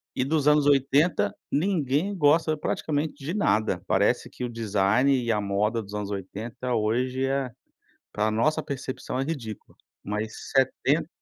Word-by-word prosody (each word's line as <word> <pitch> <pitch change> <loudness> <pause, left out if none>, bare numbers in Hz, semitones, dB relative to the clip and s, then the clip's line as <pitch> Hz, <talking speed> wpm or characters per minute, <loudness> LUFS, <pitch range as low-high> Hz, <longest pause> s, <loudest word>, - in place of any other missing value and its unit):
e 130 - +1
dos 150 0 +1
anos 150 -1 +5
80, 140 +4 +3 0.2
ninguém 165 +2 +1
gosta 155 0 +3
praticamente 150 0 -2
de 165 +6 -3
nada, 110 - +1
parece - - +2
que 125 - -8
o - - -4
design 110 +3 +2
e 120 -3 0
a 105 -1 +1
moda 105 +3 0
dos 100 +1 -12
anos 105 -1 -3
80 110 +6 -5
hoje 125 +4 0
é 135 -2 -1 0.6
pra 105 +1 0
nossa 115 +8 +1
percepção, 130 -2 -4
é - - +1
ridícula, 130 -9 -6 0.3
mas 105 +1 -5
70 140 +4 +2
130 Hz, 150 wpm, -26 LUFS, 110-145 Hz, 0.6 s, anos